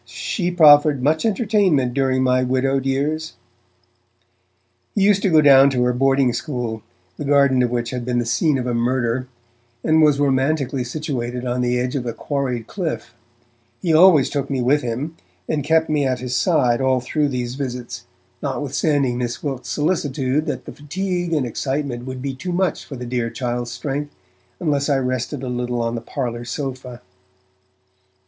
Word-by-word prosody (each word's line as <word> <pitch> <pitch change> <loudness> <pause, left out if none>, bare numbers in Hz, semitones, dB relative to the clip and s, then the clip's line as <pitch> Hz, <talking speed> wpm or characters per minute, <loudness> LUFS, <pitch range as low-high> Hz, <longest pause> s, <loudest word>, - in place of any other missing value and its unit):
she 180 -4 -3
proffered 150 -5 +6
much 155 +8 +2
entertainment 195 - +2
during 130 -1 +1
my 130 0 +3
widowed 130 +1 0
years!' 150 +4 -1 1.6
He 200 - +2
used 200 -1 +4
to 195 - +2
go 160 -2 +5
down 140 -1 +7
to 125 -2 0
her 125 0 +2
boarding 135 0 +2
school, 120 -4 -4 0.4
the - - -5
garden 140 -2 +3
of 125 - +2
which 120 -1 -2
had 125 -1 -4
been 120 0 -1
the 120 - 0
scene 150 +4 +1
of 125 - -3
a 125 - -1
murder, 120 +1 0 0.6
and 160 0 +3
was 150 -2 +4
romantically 135 -1 +1
situated 125 -3 -4
on 125 0 -1
the 125 0 +1
edge 125 +2 -2
of 125 -3 -2
a 115 - -2
quarried 130 -5 -3
cliff; 175 - -4 0.7
he 170 -4 0
always 160 -4 +6
took 140 -1 -2
me 135 -2 -1
with 135 +4 +2
him, 130 +7 -4 0.3
and 150 -2 -1
kept 160 +2 +2
me 150 -2 +1
at 130 -2 0
his 125 0 -3
side 130 -7 +2
all 130 -1 +2
through 145 +4 0
these 125 -3 -3
visits, 125 -3 -5 0.4
notwithstanding 140 -2 0
Miss 120 -1 -4
Wilkes' 130 -4 -4
solicitude 145 -1 0
that 150 - -4
the - - -8
fatigue 175 +3 -3
and 150 -5 +1
excitement 130 0 -3
would 130 0 -6
be 140 -1 -2
too 135 +8 -5
much 180 -2 -1
for 140 - -8
the 125 -1 -6
dear 120 -1 -2
child's 120 -1 -3
strength, 145 +4 -4 0.5
unless 145 -3 0
I 140 - +3
rested 130 +1 -2
a - - -4
little 125 0 -2
on 115 0 -1
the 115 - -4
parlour 120 -1 -4
sofa. 125 -1 -6
135 Hz, 175 wpm, -21 LUFS, 125-150 Hz, 1.6 s, down